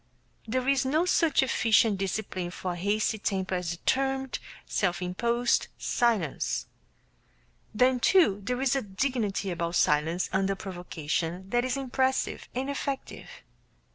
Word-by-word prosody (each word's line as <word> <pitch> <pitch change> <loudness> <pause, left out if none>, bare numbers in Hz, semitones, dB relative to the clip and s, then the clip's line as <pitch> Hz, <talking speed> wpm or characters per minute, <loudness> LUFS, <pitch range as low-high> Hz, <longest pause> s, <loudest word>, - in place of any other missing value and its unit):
There 255 +3 -1
is 275 -1 +3
no 305 +6 +2
such 330 -6 +3
efficient 225 -5 +3
discipline 190 -2 -3
for 180 +1 -4
a - - -4
hasty 210 +4 0
temper 190 -2 -1
as 180 -2 -1
determined, 265 +4 0 0.3
self 180 -2 0
imposed 235 +7 +1
silence. 225 - 0 1.1
Then, 250 +3 +3
too, 240 - +4
there 250 +4 -2
is 270 0 +2
a 270 - +1
dignity 210 -2 -1
about 170 0 -2
silence 160 +4 +2
under 195 +1 +1
provocation 175 -1 -4
that 240 0 +2
is 255 +1 -1
impressive 265 0 -1
and 260 +2 -1
effective. 280 -1 -4
215 Hz, 130 wpm, -28 LUFS, 185-260 Hz, 1.1 s, too